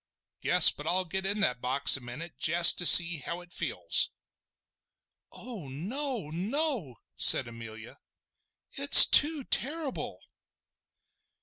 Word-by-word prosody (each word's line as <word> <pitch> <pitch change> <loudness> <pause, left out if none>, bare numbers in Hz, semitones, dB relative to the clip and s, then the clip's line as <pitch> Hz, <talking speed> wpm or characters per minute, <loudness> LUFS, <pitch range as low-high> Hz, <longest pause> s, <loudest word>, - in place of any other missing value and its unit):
Guess - - +4
but - - -14
I'll 185 +1 -4
get 190 +3 -7
in 205 +2 -5
that 125 -10 -3
box 135 +3 +1
a 130 - -7
minute 130 +8 -13
jest 170 +1 +3
to 175 - 0
see 170 -2 +5
how 170 +4 -10
it 175 0 -19
feels!" - - -2 1.2
"Oh 220 - -14
no! 210 - -9
no!" 210 - -6 0.2
said - - +3
Amelia. 115 -1 -15 0.7
"It - - 0
is - - +12
too 300 -1 +2
terrible!" 290 +3 -8
175 Hz, 125 wpm, -24 LUFS, -, 1.2 s, is